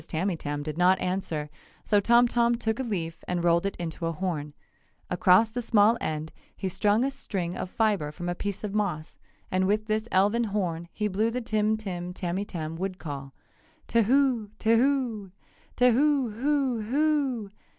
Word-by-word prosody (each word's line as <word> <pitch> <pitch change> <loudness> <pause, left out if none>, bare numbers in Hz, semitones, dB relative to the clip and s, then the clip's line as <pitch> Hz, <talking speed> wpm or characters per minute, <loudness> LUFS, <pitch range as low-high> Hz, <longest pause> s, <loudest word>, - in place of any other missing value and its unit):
Tamytam 160 -4 -2
did 155 +2 -5
not 185 +1 +5
answer, 180 -5 -2 0.4
so 205 - +3
Tom 235 +4 +5
Tom 235 0 +2
took 225 0 -2
a - - 0
leaf 170 -8 -4
and 175 -1 -1
rolled 170 +2 +3
it 195 - -4
into 165 -1 -4
a - - 0
horn. 155 -4 -3 0.6
Across 185 +5 +4
the 245 +2 -3
small 220 -1 +4
end 155 0 -3 0.2
he 190 - -3
strung 210 +5 +2
a 195 -10 -3
fibre 200 -7 0
from 175 +3 -6
a 175 - 0
piece 200 +3 -5
of 205 -2 -3
moss 175 -7 -2 0.3
and 185 0 +2
with 210 +2 +1
this 215 +1 -1
elfin 210 +5 +3
horn 180 -5 -2
he 210 - -1
blew 210 +3 +1
the 245 +2 -2
Tim 215 -2 0
Tim 180 -4 -5
Tamytam 175 -3 -4
wood 185 +1 -3
call: 140 -5 -7 0.5
"Tahoo 235 -1 +2
Tahoo 230 -3 +1 0.5
Tahoo 255 +1 +3
hoo 265 0 0
hoo!" 265 -3 0
205 Hz, 160 wpm, -27 LUFS, 175-230 Hz, 0.6 s, not